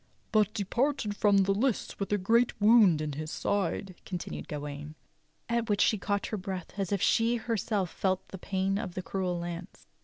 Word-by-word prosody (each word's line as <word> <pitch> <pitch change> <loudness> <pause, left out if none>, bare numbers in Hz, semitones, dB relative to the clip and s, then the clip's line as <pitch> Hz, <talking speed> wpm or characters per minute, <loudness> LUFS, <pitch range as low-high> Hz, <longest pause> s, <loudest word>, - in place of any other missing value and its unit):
" - - -38
— - - -38
but 215 -2 +3
departed 230 +2 0
from 205 -2 +4
the 195 - +1
lists 235 +3 -1
with 200 - -3
a 205 - +3
great 225 +6 +2
w^ound 205 -7 +6
in 155 -1 -2
his 155 +2 -5
side," 195 +1 -1
continued 180 -3 -5
Gawain. 145 +1 -6 0.5
At 235 -1 0
which 205 - +2
she 215 - +3
caught 200 0 -1
her 215 - -3
breath 185 -2 -5
as 195 -1 -1
if 200 -2 +1
she 230 +1 +3
herself 220 -5 -1
felt 190 -1 -1
the 190 - -8
pain 195 +1 -1
of 195 -6 -5
the 185 - -3
cruel 180 +1 -2
lance. 170 0 -7
195 Hz, 195 wpm, -29 LUFS, 180-215 Hz, 0.5 s, w^ound